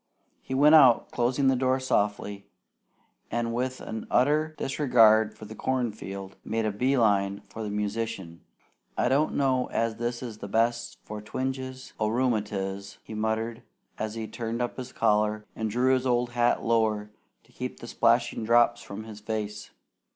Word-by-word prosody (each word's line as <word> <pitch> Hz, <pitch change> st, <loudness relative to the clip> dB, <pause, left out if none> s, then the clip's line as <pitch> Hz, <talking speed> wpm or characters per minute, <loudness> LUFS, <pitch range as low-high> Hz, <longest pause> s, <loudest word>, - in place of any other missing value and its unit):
He 130 Hz, -, -4 dB
went 150 Hz, +3 st, +6 dB
out, 135 Hz, -7 st, +6 dB
closing 125 Hz, +3 st, +1 dB
the 135 Hz, -, +4 dB
door 130 Hz, +1 st, +1 dB
softly, 100 Hz, -4 st, -1 dB, 0.8 s
and 115 Hz, 0 st, -1 dB
with 130 Hz, +2 st, -2 dB
an 110 Hz, -1 st, -6 dB
utter 155 Hz, +4 st, +2 dB
disregard 115 Hz, -6 st, +4 dB
for 110 Hz, -, -9 dB
the 110 Hz, -, -9 dB
corn 125 Hz, +1 st, -1 dB
field, 95 Hz, -2 st, -8 dB
made 110 Hz, 0 st, -1 dB
a 110 Hz, -, +1 dB
bee 130 Hz, +7 st, +1 dB
line 100 Hz, -3 st, +2 dB
for 115 Hz, -, -10 dB
the 105 Hz, -, -3 dB
musician. 105 Hz, -4 st, -3 dB, 0.6 s
"I -, -, +2 dB
don't 145 Hz, +4 st, +2 dB
know 130 Hz, -2 st, +2 dB
as 115 Hz, -1 st, -1 dB
this 120 Hz, +1 st, -3 dB
is 110 Hz, -3 st, -7 dB
the 100 Hz, -, -6 dB
best 120 Hz, +3 st, 0 dB
for 105 Hz, 0 st, -7 dB
twinges 130 Hz, +3 st, -5 dB
o' 110 Hz, -, +1 dB
rheumatiz," 105 Hz, -5 st, -1 dB
he -, -, -9 dB
muttered, 110 Hz, +2 st, -2 dB, 0.4 s
as 110 Hz, 0 st, -3 dB
he 110 Hz, -1 st, -4 dB
turned 115 Hz, 0 st, -4 dB
up 120 Hz, 0 st, -2 dB
his 130 Hz, -1 st, -6 dB
collar 105 Hz, -1 st, +1 dB
and 110 Hz, -1 st, -2 dB
drew 125 Hz, +4 st, +2 dB
his 130 Hz, 0 st, +1 dB
old 120 Hz, -1 st, +1 dB
hat 120 Hz, 0 st, +2 dB
lower 110 Hz, -2 st, +1 dB, 0.3 s
to -, -, -26 dB
keep -, -, -6 dB
the -, -, -9 dB
splashing -, -, +2 dB
drops 120 Hz, +1 st, +4 dB
from 100 Hz, +2 st, -8 dB
his 110 Hz, -1 st, -10 dB
face. 105 Hz, -1 st, -4 dB
115 Hz, 170 wpm, -27 LUFS, 105-125 Hz, 0.8 s, went